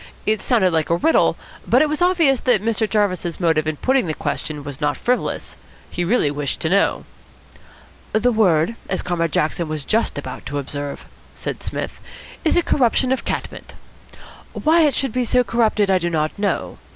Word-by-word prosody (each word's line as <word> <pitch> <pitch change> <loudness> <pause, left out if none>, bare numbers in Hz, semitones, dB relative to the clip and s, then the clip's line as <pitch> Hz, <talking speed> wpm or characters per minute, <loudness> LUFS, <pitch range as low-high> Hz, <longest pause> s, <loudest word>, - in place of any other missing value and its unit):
It 215 0 +1
sounded 215 -8 +2
like 160 -2 0
a 170 - +3
riddle, 320 - +3 0.3
but 255 +5 +5
it - - +2
was 305 +2 -3
obvious 335 -8 +3
that 235 -5 +2
Mr. 220 -1 0
Jarvis's 185 -5 0
motive 160 -3 +1
in 155 - -1
putting 260 - +1
the 155 - -2
question 150 -2 -4
was 140 -2 -8
not 145 0 0
frivolous. 250 +1 -2 0.3
He 175 - -2
really 175 -6 +2
wished 145 -2 -2
to 160 - 0
know. 200 +1 +2 1.1
"The 230 +3 +2
word, 185 -4 +3 0.2
as 190 - -1
Comrade 165 -2 -1
Jackson 155 +3 0
was 155 -2 -4
just 225 -6 0
about 130 -3 -6
to 145 - -3
observe," 145 0 -5 0.3
said - - -5
Psmith, - - -5 0.4
"is 320 - +2
a 350 - +3
corruption 255 -2 +2
of 265 - -1
cat - - -2
mint. - - -12 0.8
Why 325 +2 +3
it 295 -4 +3
should 270 -3 0
be 250 +2 0
so 250 +1 +3
corrupted 220 -4 +1
I 185 - +3
do 175 0 -1
not 155 -2 0
know. 205 -1 -2
200 Hz, 190 wpm, -20 LUFS, 155-250 Hz, 1.1 s, but